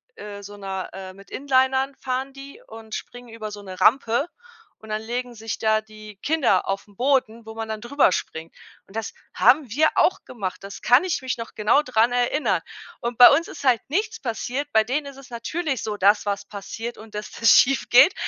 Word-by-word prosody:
äh, 205 -1 -9
so 205 +1 -10
'ner 190 -1 -5
äh, 190 -1 -8
mit 195 0 -17
Inlinern 265 0 +1
fahren 260 +1 -3
die 275 +1 -12
und 220 -1 -11
springen 245 -1 -9
über 215 -2 -7
so 205 - -8
'ne 185 -2 -9
Rampe 240 +4 +3 0.5
und 220 - -13
dann 215 0 -2
legen 240 +1 -4
sich 220 0 -5
da 220 0 +2
die 215 -1 -13
Kinder 285 - +2
auf 195 +1 -3
'n 205 - -21
Boden, 245 -3 0
wo 220 - -9
man 225 0 -4
dann 215 -1 -4
drüber 270 -2 +3
springt. 160 +1 -5 0.3
Und 195 - -17
das 225 -1 -4 0.2
haben 270 -1 +4
wir 310 +5 +3
auch 370 - +2
gemacht, 200 -7 -6
das 200 +1 -9
kann 245 +8 +5
ich 360 -6 -1
mich 260 -2 -3
noch 230 - -7
genau 215 +7 +3
dran 240 -3 +2
erinnern. 245 +5 +1 0.4
Und 235 -1 -3
bei 245 - +11
uns 335 +3 -1
ist 285 - -9
halt 240 -5 +4
nichts 430 +8 -1
passiert. 255 +3 -3
Bei 220 - +5
denen 285 +5 -1
ist 275 -1 -10
es 270 -2 -14
natürlich 285 +3 -3
so, 210 -1 -3
dass 205 +2 +3
was 200 0 -2
passiert 225 +4 -7
und 215 0 -13
dass 210 - -5
das 230 - +3
schiefgeht. 270 +4 +6
230 Hz, 205 wpm, -23 LUFS, 210-265 Hz, 0.5 s, bei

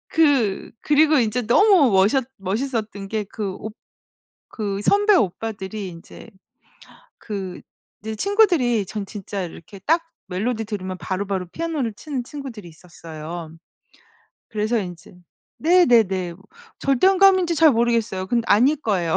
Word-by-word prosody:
그 280 -11 +2
그리고 305 0 +4
인제 235 +1 0
너무 350 - +5
멋있 200 +7 +3
멋있었던 210 0 -3
게 215 -1 -2
그 200 -1 -5
옵 215 0 -7 0.8
그 200 -2 -3
선배 410 - +4
오빠들이 205 - -2
인제 170 +6 -12 0.9
그 195 -4 -6 0.4
이제 220 +1 -5
친구들이 340 - +2
전 205 +1 -5
진짜 200 -1 -6
이렇게 175 +3 -10
딱 325 - +2 0.3
멜로디 220 +5 -2
들으면 190 -3 -5
바로바로 190 -1 -3
피아노를 310 -9 -3
치는 275 -3 -5
친구들이 240 - -9
있었어요. 165 0 -9 1.0
그래서 215 +2 -1
인제 180 -2 -7 0.4
네네네. 225 - +3
뭐 190 +3 -20 0.3
절대 275 +5 +2
음감인지 375 -3 +4
잘 315 -2 +5
모르겠어요. 230 -5 0
근데 235 +2 0
아닐 255 +9 +4
거예요. 185 - 0
220 Hz, 290 characters per minute, -22 LUFS, 190-275 Hz, 1.0 s, 너무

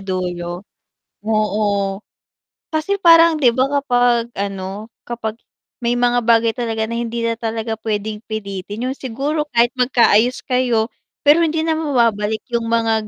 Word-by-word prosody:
dulo. 180 -1 -4 0.6
Oo. 215 -1 0 1.1
Kasi 325 +6 -1
parang 330 -3 +6
di 255 - +5
ba, 260 +2 +1
kapag 245 -3 +2
ano, 200 +2 -5 0.2
kapag 230 -1 -5 0.4
may 240 0 0
mga 245 0 +2
bagay 230 -1 +4
talaga 225 -2 -3
na 235 - -2
hindi 235 0 -3
na 230 0 -1
talaga 225 -1 -3
puwedeng 215 -1 -3
pilitin. 205 0 -5
Yung 270 - -7
siguro 280 +5 -2
kahit 235 +1 +4
magkaayos 245 -1 +3
kayo, 245 -3 0 0.3
pero 295 +3 +6
hindi 320 -1 +1
na 325 - 0
mababalik 230 -8 0
yung 235 -1 -1
mga 225 -2 +1
230 Hz, 140 wpm, -19 LUFS, 215-250 Hz, 1.1 s, parang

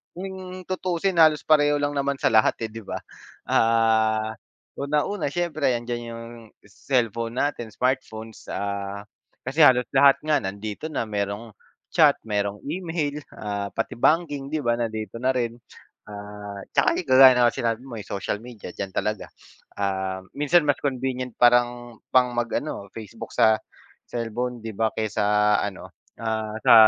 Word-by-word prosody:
kung 185 0 -7
tutusin 185 -1 -1
halos 155 -2 +5
pareho 145 -1 +4
lang 145 - +1
naman 140 0 0
sa - - +4
lahat 110 -1 +4
eh, - - -6
'di 115 0 -8
ba? - - -4 0.5
Ah, 110 -1 +3 0.5
unang-una, 150 +6 0
siyempre, 155 -6 0
andiyan 120 0 -4
yung 115 0 -8 0.4
cellphone 115 0 -1
natin, 145 -5 -1
smartphones, 115 -4 -3
ah, 100 0 -4 0.4
kasi 135 +5 -3
halos 125 -3 +6
lahat 140 0 +7
nga 155 -1 +3
nandito 100 +7 -5
na - - -1
merong 105 +2 -3 0.4
chat, - - +6
merong 100 -1 -1
email, 160 -3 -2 0.2
ah, 100 -1 -3
pati - - -2
banking, 145 -2 +2
'di 155 - -1
ba, 120 0 +2
nandito 110 -2 -3
na 130 +1 +3
rin. 120 -2 -1 0.5
Ah, 105 -1 -8
'tsaka - - +3
kagaya 130 -1 +8
na 120 -1 +5
sinabi 115 0 -1
mo 120 -3 -8
ay 105 - -8
social 100 +1 -3
media 120 -7 -9
diyan 95 -1 -5
talaga. 105 -1 -2 0.5
Ah, 95 -1 -2
minsan 150 +3 +3
mas 145 - +3
convenient 130 -2 -2
parang 120 -1 +3
pang 125 -1 +5
mag-ano 120 -2 -2
Facebook 110 -3 -8
sa 110 0 +5 0.5
cellphone, 120 +1 -3
'di 115 - -4
ba, 110 +1 +1
kaysa 110 -1 -1
sa - - +2 0.4
ano, 100 -2 -7 0.3
ah, 110 -1 -2
sa - - +8
120 Hz, 145 wpm, -24 LUFS, 110-140 Hz, 0.5 s, kagaya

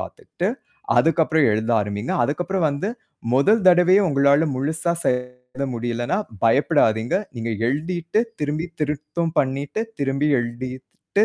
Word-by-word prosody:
பாத்துட்டு, 210 - -4 0.5
அதுக்கப்புறம் 160 -2 +3
எழுத 110 +2 -1
ஆரம்பிங்க. 105 +2 -3
அதுக்கப்புறம் 175 +5 -1
வந்து 140 +8 -3 0.5
முதல் 200 +10 +3
தடவையா 180 +3 +5
உங்களால 140 +1 +4
முழுசா 160 +5 -1
செயல்பட 125 +1 -3
முடியலன்னா 120 - -2 0.3
பயப்படாதீங்க. 115 -2 +2 0.2
நீங்க 115 0 -3 0.2
எழுதிட்டு 170 - -1 0.2
திரும்பி 150 +3 -2
திருத்தும் 150 +2 -2
பண்ணிட்டு, 140 +10 -2 0.2
திரும்பி 140 +2 0
எழுதிட்டு 130 - -3
140 Hz, 105 wpm, -22 LUFS, 125-170 Hz, 0.5 s, தடவையா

